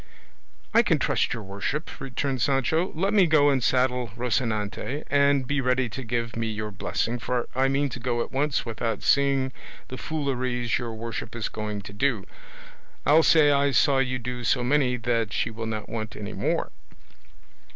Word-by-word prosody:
"I - - +7
can - - +2
trust - - +1
your 115 - -3
worship," 100 - -3
returned 135 -1 -2
Sancho; 140 - +1
"let 195 +6 0
me 195 -4 +5
go 145 -2 +5
and 130 -3 +1
saddle 125 -1 +1
Rocinante, 120 +2 -1
and 140 -1 +3
be 140 +2 0
ready 125 -1 +1
to 110 +5 -6
give 115 -1 -2
me 115 0 -1
your 105 -1 -4
blessing, 115 +3 -2
for 120 +1 -2
I 130 +1 +2
mean 140 +1 +1
to 125 - -7
go 120 0 -1
at - - -10
once 140 +1 0
without 115 -1 -3
seeing 135 -2 +3 0.4
the 130 - -6
fooleries 130 -5 -1
your 115 -2 -5
worship 115 0 -5
is 115 -3 -2
going 105 -1 -4
to 100 - -10
do; 110 -3 0 0.8
I'll 155 +3 +6
say 155 -2 +5
I 140 0 +3
saw 140 0 +3
you 130 -1 0
do 125 0 -5
so 125 +2 +2
many 125 -1 +2
that 115 -3 -1
she - - 0
will 115 0 -5
not 110 -1 -4
want 110 -2 -5
any 105 0 -6
more." - - -1
125 Hz, 180 wpm, -26 LUFS, 115-140 Hz, 0.8 s, I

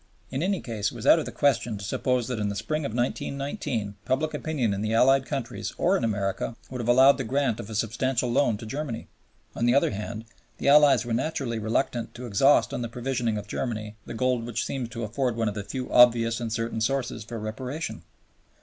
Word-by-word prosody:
In 135 +2 -2
any 190 +1 0
case, 105 -4 -2
it - - -12
was 115 +1 -7
out 160 - +7
of 155 - -4
the - - -5
question 120 -6 +1
to 100 - -8
suppose 125 +2 0
that 125 -3 -3
in 105 -1 0
the 100 - -3
spring 155 +8 -2
of 110 - -6
1919 125 - -2
public 155 +4 0
opinion 135 -10 -1
in 100 - -3
the 110 +1 0
Allied 135 +3 +4
countries 135 -4 -4
or 185 +3 +3
in 130 - -1
America 100 0 -1 0.2
would 125 -1 -4
have 115 - -4
allowed 130 +3 +6
the - - 0
grant 130 -1 0
of 100 - -7
a 110 - -6
substantial 120 +3 0
loan 120 -4 +2
to 115 - -9
Germany. 135 -1 -5 0.5
On 120 - +1
the 120 - +4
other 140 - +3
hand, 105 +2 -5 0.3
the - - +1
Allies 140 -4 +6
were 120 - -2
naturally 130 -2 -1
reluctant 115 +2 -1
to 125 +1 -7
exhaust 130 +6 +4
on - - -2
the 120 - -3
provisioning 120 -2 -1
of 105 - -6
Germany 110 -4 -4
the - - -6
gold 125 0 +1
which 120 - -2
seemed 130 -4 -3
to 115 -1 -5
afford 120 +3 -1
one 115 -1 0
of 105 - -1
the 100 0 -4
few 130 +4 -5
obvious 115 -1 +5
and 115 -2 -4
certain 115 0 -2
sources 125 -1 -1
for 115 +2 -7
Reparation. 125 - -5
120 Hz, 220 wpm, -26 LUFS, 110-135 Hz, 0.5 s, out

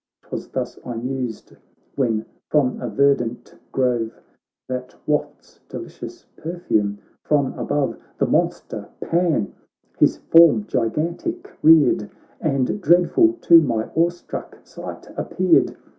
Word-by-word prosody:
'Twas - - -6
thus 125 -1 -4
I 120 - -5
mused, 125 -1 -5 0.4
when 115 -5 0 0.2
from 140 -4 +1
a 120 - -3
ver 140 +6 +4
dant 120 -2 -6 0.2
grove 120 -3 0 0.5
That 125 0 -5
wafts 150 -1 -3
delicious - - -9
perfume 110 - -1 0.3
from 145 -3 +1
above, 145 -2 -1 0.2
The - - +2
monster - - -1
Pan 165 - 0 0.5
his - - +4
form 165 -11 +5
gigantic 170 - -2
reared, 155 -9 +5 0.3
And 140 +5 0
dreadful 180 - +4
to 165 -1 +7
my 115 -7 -1
awe 165 +2 +3
struck 175 0 -8
sight - - -9
appeared. - - +2
135 Hz, 115 wpm, -22 LUFS, 120-165 Hz, 0.5 s, to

